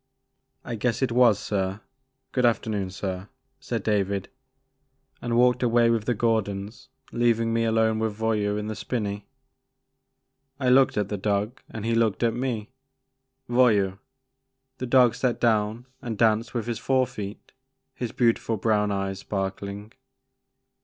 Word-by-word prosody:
' -, -, -44 dB
I 120 Hz, -, -4 dB
guess 115 Hz, +2 st, -1 dB
it 130 Hz, -, +1 dB
was 120 Hz, -3 st, +5 dB
sir; 95 Hz, -1 st, -2 dB, 0.5 s
good 125 Hz, -, 0 dB
afternoon 110 Hz, -5 st, +1 dB
sir," 95 Hz, 0 st, -5 dB, 0.3 s
said 120 Hz, -5 st, -3 dB
David, 100 Hz, -2 st, 0 dB, 0.9 s
and 120 Hz, -1 st, -1 dB
walked 125 Hz, 0 st, +4 dB
away 120 Hz, -1 st, +4 dB
with 115 Hz, -2 st, 0 dB
the 120 Hz, -, +1 dB
Gordons 105 Hz, -2 st, -1 dB, 0.2 s
leav 120 Hz, -1 st, +2 dB
ing 115 Hz, 0 st, 0 dB
me 115 Hz, 0 st, +1 dB
alone 110 Hz, -1 st, +2 dB
with 110 Hz, -2 st, -2 dB
Voyou 105 Hz, -2 st, 0 dB
in 105 Hz, -, -3 dB
the 110 Hz, -, -3 dB
spinney. 105 Hz, -4 st, -3 dB, 1.3 s
I 130 Hz, -2 st, +1 dB
looked 130 Hz, -1 st, +5 dB
at 105 Hz, -2 st, 0 dB
the 105 Hz, -, -3 dB
dog 105 Hz, +4 st, -1 dB
and 110 Hz, -1 st, -6 dB
he 115 Hz, -, +1 dB
looked 115 Hz, -1 st, +1 dB
at 115 Hz, -1 st, +2 dB
me. 120 Hz, -2 st, -3 dB, 0.4 s
*' 130 Hz, 0 st, -53 dB
Voyou!*' 105 Hz, -6 st, +3 dB, 0.8 s
The 130 Hz, -, -3 dB
dog 125 Hz, -2 st, +5 dB
sat 125 Hz, -2 st, -1 dB
down 110 Hz, 0 st, +1 dB, 0.2 s
and 115 Hz, -4 st, -4 dB
danced 115 Hz, +2 st, +2 dB
with 115 Hz, -, -1 dB
his 115 Hz, -2 st, -3 dB
fore 130 Hz, -1 st, +2 dB
feet, 105 Hz, -5 st, -8 dB, 0.4 s
his 120 Hz, -3 st, -4 dB
beautiful 115 Hz, -2 st, +1 dB
brown 105 Hz, 0 st, +1 dB
eyes 100 Hz, -1 st, -2 dB
sparkling. 100 Hz, +2 st, -4 dB
110 Hz, 155 wpm, -25 LUFS, 105-120 Hz, 1.3 s, was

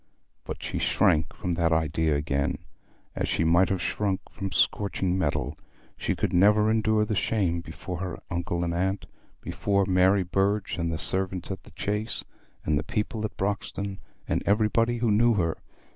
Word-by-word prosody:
But -, -, -6 dB
she -, -, -3 dB
shrank 75 Hz, -1 st, +2 dB
from 90 Hz, -, -3 dB
that 85 Hz, -1 st, +1 dB
idea 80 Hz, -1 st, +1 dB
again, 70 Hz, -1 st, 0 dB, 0.6 s
as -, -, -1 dB
she -, -, +1 dB
might 85 Hz, +3 st, +4 dB
have 95 Hz, -2 st, -1 dB
shrunk 100 Hz, -3 st, -1 dB
from 95 Hz, -1 st, -5 dB
scorching 95 Hz, -3 st, +1 dB
metal. 80 Hz, -6 st, -1 dB, 0.4 s
She -, -, -1 dB
could -, -, -1 dB
never 105 Hz, +4 st, +5 dB
endure 110 Hz, -1 st, +2 dB
that 110 Hz, -, -2 dB
shame 95 Hz, -6 st, 0 dB
before 85 Hz, +2 st, -7 dB
her 90 Hz, -1 st, -4 dB
uncle 85 Hz, 0 st, -1 dB
and 85 Hz, -1 st, -1 dB
aunt, 95 Hz, +3 st, -1 dB, 0.4 s
before 100 Hz, -1 st, 0 dB
Mary 95 Hz, +1 st, +4 dB
Burge, 95 Hz, +2 st, 0 dB
and 85 Hz, 0 st, 0 dB
the 80 Hz, -, -2 dB
servants 95 Hz, +1 st, 0 dB
at 95 Hz, -, -5 dB
the -, -, -15 dB
Chase, 105 Hz, +4 st, -2 dB, 0.4 s
and 75 Hz, -1 st, +2 dB
the -, -, -3 dB
people 110 Hz, -1 st, -2 dB
at 110 Hz, -, -6 dB
Broxton, 100 Hz, 0 st, -3 dB, 0.3 s
and -, -, 0 dB
everybody 115 Hz, +3 st, +2 dB
who 115 Hz, -2 st, +1 dB
knew 115 Hz, +2 st, +4 dB
her. 85 Hz, -5 st, 0 dB
95 Hz, 170 wpm, -27 LUFS, 85-105 Hz, 0.6 s, never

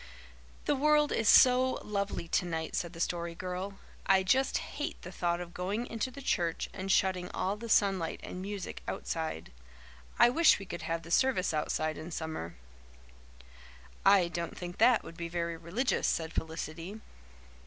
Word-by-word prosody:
"The -, -, +3 dB
world 300 Hz, +1 st, +3 dB
is 225 Hz, -, +2 dB
so 255 Hz, 0 st, +6 dB
lovely 200 Hz, -4 st, -2 dB
tonight," 165 Hz, -2 st, -1 dB
said 170 Hz, 0 st, -2 dB
the 165 Hz, -, -10 dB
Story 170 Hz, -1 st, -2 dB
Girl. 185 Hz, +3 st, -4 dB, 0.3 s
"I 190 Hz, -1 st, +5 dB
just 260 Hz, +8 st, +2 dB
hate 295 Hz, -, -5 dB
the 180 Hz, -, -7 dB
thought 175 Hz, -1 st, -1 dB
of 175 Hz, -1 st, -7 dB
going 200 Hz, +6 st, -2 dB
into 230 Hz, +1 st, -3 dB
the 275 Hz, +2 st, -10 dB
church 170 Hz, -8 st, 0 dB
and 195 Hz, 0 st, -3 dB
shutting 185 Hz, -2 st, +2 dB
all 195 Hz, +2 st, 0 dB
the 230 Hz, +2 st, -8 dB
sunlight 195 Hz, -6 st, +2 dB
and 180 Hz, -, -6 dB
music 200 Hz, -1 st, -5 dB
outside. 155 Hz, -, -4 dB, 0.7 s
I -, -, +7 dB
wish 325 Hz, +5 st, +5 dB
we 195 Hz, -, -8 dB
could 175 Hz, -1 st, -6 dB
have 165 Hz, 0 st, -3 dB
the 165 Hz, -, -10 dB
service 210 Hz, -7 st, +2 dB
outside 155 Hz, 0 st, -1 dB
in 155 Hz, +2 st, -7 dB
summer." 160 Hz, -, -5 dB, 1.5 s
"I 195 Hz, -3 st, +6 dB
don't 170 Hz, -1 st, -4 dB
think 175 Hz, 0 st, -7 dB
that 235 Hz, +1 st, +5 dB
would 165 Hz, -, -11 dB
be 170 Hz, -1 st, -4 dB
very 170 Hz, -1 st, -2 dB
religious," 180 Hz, +11 st, -1 dB
said 160 Hz, -1 st, -1 dB
Felicity. 165 Hz, +5 st, -5 dB
180 Hz, 165 wpm, -31 LUFS, 170-210 Hz, 1.5 s, I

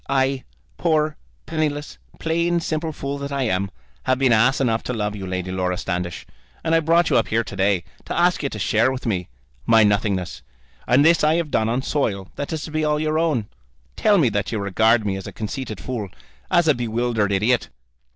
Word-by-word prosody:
I, 135 Hz, -1 st, +1 dB, 0.3 s
poor, 155 Hz, -1 st, +1 dB, 0.3 s
penniless, 150 Hz, -2 st, -2 dB, 0.2 s
plain 170 Hz, +1 st, +1 dB
simple 160 Hz, -1 st, -2 dB
fool 140 Hz, -1 st, -4 dB
that 140 Hz, 0 st, -5 dB
I 140 Hz, -1 st, 0 dB
am, 100 Hz, -4 st, 0 dB, 0.4 s
have 130 Hz, -, +2 dB
been 130 Hz, -2 st, +3 dB
ass 115 Hz, +4 st, +4 dB
enough 115 Hz, -4 st, +1 dB
to 125 Hz, -, -2 dB
love 105 Hz, -2 st, -2 dB
you, 95 Hz, -2 st, -6 dB
Lady 90 Hz, 0 st, -3 dB
Laura 90 Hz, -1 st, -1 dB
Standish; 90 Hz, -2 st, -3 dB, 0.4 s
and 160 Hz, -, 0 dB
I 165 Hz, -, +5 dB
brought 165 Hz, +2 st, +3 dB
you -, -, +5 dB
up -, -, +2 dB
here 115 Hz, +1 st, +1 dB
to 100 Hz, -, -8 dB
day 95 Hz, -2 st, +2 dB, 0.2 s
to -, -, -4 dB
ask 175 Hz, +1 st, +3 dB
you 140 Hz, -, -1 dB
to 110 Hz, -, -6 dB
share 110 Hz, +4 st, +2 dB
with 130 Hz, 0 st, -5 dB
me 95 Hz, -6 st, -1 dB, 0.4 s
my 115 Hz, -1 st, +6 dB
nothingness. 100 Hz, -3 st, 0 dB, 0.5 s
And 130 Hz, +5 st, +5 dB
this 165 Hz, -1 st, +5 dB
I 155 Hz, +1 st, +4 dB
have 165 Hz, -3 st, -1 dB
done 110 Hz, 0 st, +1 dB
on 125 Hz, +3 st, 0 dB
soil 100 Hz, -11 st, -1 dB
that 145 Hz, -, -4 dB
is 160 Hz, -2 st, -3 dB
to 155 Hz, -, -7 dB
be 155 Hz, 0 st, -1 dB
all 150 Hz, 0 st, +1 dB
your 155 Hz, 0 st, 0 dB
own. 145 Hz, -11 st, 0 dB, 0.5 s
Tell 210 Hz, -2 st, +4 dB
me 145 Hz, -9 st, +4 dB
that 100 Hz, -1 st, -2 dB
you 115 Hz, -, -1 dB
regard 110 Hz, +3 st, +2 dB
me 95 Hz, -1 st, -1 dB
as 95 Hz, -, -7 dB
a -, -, -6 dB
conceited 110 Hz, 0 st, -5 dB
fool, 115 Hz, -6 st, -4 dB, 0.4 s
as 175 Hz, -2 st, +3 dB
a 155 Hz, -, +6 dB
bewildered 115 Hz, -3 st, 0 dB
idiot." 110 Hz, +5 st, +1 dB
125 Hz, 210 wpm, -22 LUFS, 105-155 Hz, 0.5 s, my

